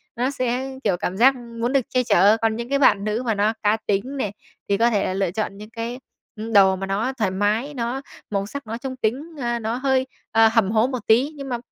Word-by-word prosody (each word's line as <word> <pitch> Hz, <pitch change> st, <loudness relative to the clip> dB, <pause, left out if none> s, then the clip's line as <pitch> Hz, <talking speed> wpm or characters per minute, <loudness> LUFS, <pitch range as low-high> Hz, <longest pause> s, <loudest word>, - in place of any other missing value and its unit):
nó 250 Hz, +2 st, 0 dB
sẽ, 255 Hz, 0 st, -2 dB
kiểu, 195 Hz, -5 st, +1 dB
cảm 180 Hz, +1 st, -3 dB
giác 265 Hz, +5 st, +6 dB
muốn 235 Hz, 0 st, -4 dB
được 275 Hz, -, +4 dB
che 255 Hz, -1 st, +1 dB
chở. 205 Hz, -1 st, +5 dB
Còn 225 Hz, -1 st, +1 dB
những 235 Hz, +1 st, -5 dB
cái 280 Hz, 0 st, +1 dB
bạn 205 Hz, -7 st, +4 dB
nữ 215 Hz, +3 st, -1 dB
mà 225 Hz, -, +1 dB
nó 210 Hz, +2 st, +2 dB
cá 210 Hz, +1 st, +3 dB
tính 235 Hz, +8 st, -1 dB
này, 210 Hz, -7 st, -2 dB, 0.4 s
thì 200 Hz, -, +2 dB
có 230 Hz, +3 st, +4 dB
thể 205 Hz, -4 st, +1 dB
là -, -, -1 dB
lựa 195 Hz, -2 st, 0 dB
chọn 200 Hz, 0 st, -3 dB
những 210 Hz, +1 st, -10 dB
cái 230 Hz, +2 st, -5 dB, 0.5 s
đồ 190 Hz, -2 st, +6 dB
mà 190 Hz, +1 st, -4 dB
nó 210 Hz, +7 st, -1 dB
thoải 210 Hz, -5 st, 0 dB
mái, 210 Hz, +9 st, 0 dB
nó 245 Hz, +1 st, -3 dB, 0.3 s
màu 200 Hz, -1 st, -1 dB
sắc 280 Hz, +3 st, -8 dB
nó 225 Hz, +1 st, -4 dB
trung 260 Hz, +1 st, -6 dB
tính, 250 Hz, +3 st, -1 dB, 0.2 s
à, 240 Hz, -2 st, -1 dB
nó 225 Hz, +1 st, -2 dB
hơi, 260 Hz, 0 st, +1 dB, 0.2 s
à, 225 Hz, 0 st, +6 dB
hầm 220 Hz, -4 st, +3 dB
hố 220 Hz, +2 st, +3 dB
một 255 Hz, -1 st, -3 dB
tí. 250 Hz, +7 st, +4 dB
Nhưng 275 Hz, -2 st, -7 dB
mà, 245 Hz, -, -1 dB
230 Hz, 245 wpm, -22 LUFS, 205-255 Hz, 0.5 s, giác